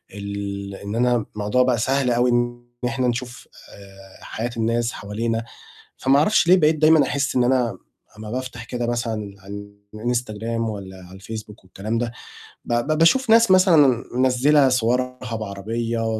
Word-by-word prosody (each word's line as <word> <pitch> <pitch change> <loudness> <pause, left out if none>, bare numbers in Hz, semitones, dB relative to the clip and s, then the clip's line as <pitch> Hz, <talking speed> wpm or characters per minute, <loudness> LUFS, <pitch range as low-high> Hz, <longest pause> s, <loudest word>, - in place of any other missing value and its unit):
ال 100 -1 -5
إن 100 +2 -6
أنا 120 -1 +1
الموضوع 105 +5 +1
بقى 125 -1 +1
سهل 130 +2 +1
أوي 120 +1 +2
إن 120 0 -1 0.2
إحنا 125 +1 0
نشوف 120 0 -4 0.3
آآ 95 -1 -15
حياة 115 +2 -4
الناس 115 +1 0
حوالينا، 115 +3 -3 0.5
فما 135 +1 +3
أعرفش 170 +3 +3
ليه 185 - +8
بقيت 155 -3 +3
دايمًا 155 0 +5
أحِس 140 0 -1
إن 125 - +3
أنا 120 -6 +1 0.4
أمّا 110 0 -8
بافتح 125 0 -5
كده 120 0 -3
مثلًا 115 -4 -3
عن 100 +1 -10 0.2
الInstagram 115 -1 -2
والّا 100 -4 -5
على 95 +2 -13
الFacebook 105 0 -9
والكلام 105 +5 -4
ده، 120 -1 -2 0.5
ب - - -2
ب 140 +6 0
باشوف 235 +10 +3
ناس 230 -3 +6
مثلًا 155 - +5
منزِّلة 130 +2 +4
صورها 125 0 -1
بعربية، 110 +2 -3
120 Hz, 150 wpm, -22 LUFS, 105-130 Hz, 0.5 s, ليه